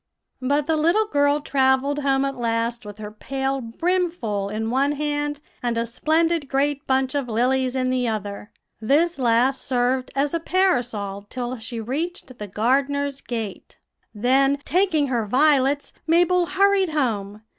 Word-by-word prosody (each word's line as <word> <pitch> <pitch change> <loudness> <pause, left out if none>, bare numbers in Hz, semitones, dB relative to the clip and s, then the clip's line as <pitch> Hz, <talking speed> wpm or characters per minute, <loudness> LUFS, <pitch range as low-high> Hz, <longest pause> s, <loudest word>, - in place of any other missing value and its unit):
"But 285 +3 +1
the 320 +1 +1
little 340 +8 +3
girl 285 -4 +2
travelled 270 +1 +1
home 275 -1 +1
at 275 0 -3
last 230 -1 -2
with 205 0 -9
her 210 -1 -7
pail 270 +4 -3
brimful 245 - -1
in 220 +2 -3
one 275 +3 +2
hand, 295 0 -2 0.2
and 240 -1 -1
a 230 - 0
splendid 315 +5 0
great 280 +1 0
bunch 265 0 +1
of 280 -3 -1
lilies 255 +3 +1
in 255 -1 0
the 250 -1 0
other. 205 -1 -4 0.3
This 295 +9 +2
last 250 +2 +2
served 255 0 0
as 280 +2 0
a 335 - +1
parasol 240 - 0
till 250 0 -4
she 230 +1 -6
reached 270 +2 -5
the 210 - -5
gardener's 275 +6 0
gate. 225 -5 -6 0.3
"Then, 265 +5 +2
taking 355 -5 +2
her 235 -4 -1
violets, 280 +2 +2
Mabel 350 +2 +3
hurried 395 -1 +3
home. 215 -7 -2
265 Hz, 150 wpm, -23 LUFS, 235-295 Hz, 0.3 s, little